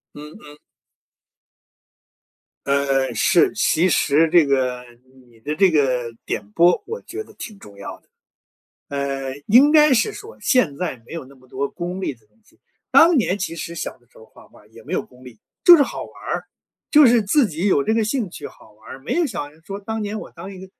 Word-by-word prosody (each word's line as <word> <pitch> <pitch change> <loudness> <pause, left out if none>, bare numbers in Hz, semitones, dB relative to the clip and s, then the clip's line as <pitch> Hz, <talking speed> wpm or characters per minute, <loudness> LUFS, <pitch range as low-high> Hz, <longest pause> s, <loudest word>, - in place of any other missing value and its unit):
嗯 150 +1 -10
嗯。 150 0 -14 2.1
嗯， 140 -1 +1
是， 175 - +3
其 180 -4 +2
实 160 -2 +2
这 170 -1 +5
个 130 -3 0 0.5
你 115 -1 -22
的 150 +7 -4
这 190 +2 +4
个 125 -6 0
点 105 0 -5
拨 170 +9 +3
我 460 +2 -6
觉 430 - -7
得 - - -18
挺 215 -4 -9
重 100 - -15
要 100 0 -8
的。 - - -38 0.8
呃， 135 -1 -3
应 265 +8 +6
该 300 -3 +6
是 250 - +1
说 430 +3 -11
现 195 - +2
在 160 -6 -4
没 - - -10
有 165 - -6
那 135 +2 -17
么 130 -1 -23
多 140 +2 -3
功 180 +2 -6
利 - - -2
的 115 -4 -21
东 105 - -36
西， 330 +9 -28 0.3
当 335 0 +6
年 205 -6 +1
其 170 -4 -4
实 170 +1 -6
小 170 - -5
的 120 - -31
时 - - -20
候 110 - -16
画 - - -19
画 - - -20
儿 - - -23
也 - - -16
没 - - -9
有 - - +1
功 125 0 -19
利， 120 -4 -13 0.3
就 350 - +10
是 310 - +5
好 - - -4
玩 - - -16
儿， - - -3 0.5
就 300 -2 +7
是 235 -1 +4
自 235 +7 +2
己 170 +1 -3
有 165 -8 +3
这 220 - 0
个 225 -1 +1
兴 225 -1 -2
趣 - - -8
好 110 - -16
玩 110 +1 -17
儿， - - -8
没 135 - -4
有 345 - +2
想 175 - -5
着 155 - -22
说 195 +2 -7
当 220 +2 -4
年 210 +1 -4
我 - - -10
当 195 - -10
一 190 - -11
个 190 - -10
170 Hz, 235 characters per minute, -21 LUFS, 135-220 Hz, 2.1 s, 就